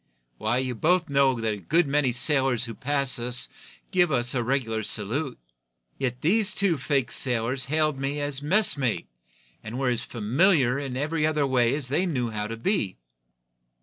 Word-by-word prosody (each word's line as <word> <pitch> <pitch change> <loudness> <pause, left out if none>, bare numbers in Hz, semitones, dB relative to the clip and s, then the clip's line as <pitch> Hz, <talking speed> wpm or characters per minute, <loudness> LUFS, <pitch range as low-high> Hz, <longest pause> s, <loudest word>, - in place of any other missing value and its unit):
Why, 110 +3 0
you 130 -1 -1
both 170 +7 +1
know 135 -3 +3
that 110 -1 -1
a - - -5
good 160 - +1
many 140 -2 +1
sailors 130 -2 +1
who 115 - -6
pass 140 +1 0
us 125 +1 +1 0.4
give 180 -4 +3
us 120 -2 +1
the 125 -2 0
regular 115 -3 -1
salute. 120 +7 -2 0.6
Yet 125 -1 -2
these 205 +5 +2
two 195 -7 +2
fake 135 -2 0
sailors 125 +1 0
hailed 155 -1 0
me 140 +2 -2
as 145 -1 -2
'messmate' 145 - +1 0.5
and 110 +3 -6
were 135 -1 0
as 120 -2 -1
familiar 130 - +2
in 135 -3 -4
every 155 +2 0
other 150 -2 +1
way 125 -1 +2
as 140 -4 -1
they 175 +7 +1
knew 125 -8 -2
how 105 -1 -3
to 115 +1 -6
be." 115 - -1
135 Hz, 175 wpm, -25 LUFS, 120-150 Hz, 0.6 s, know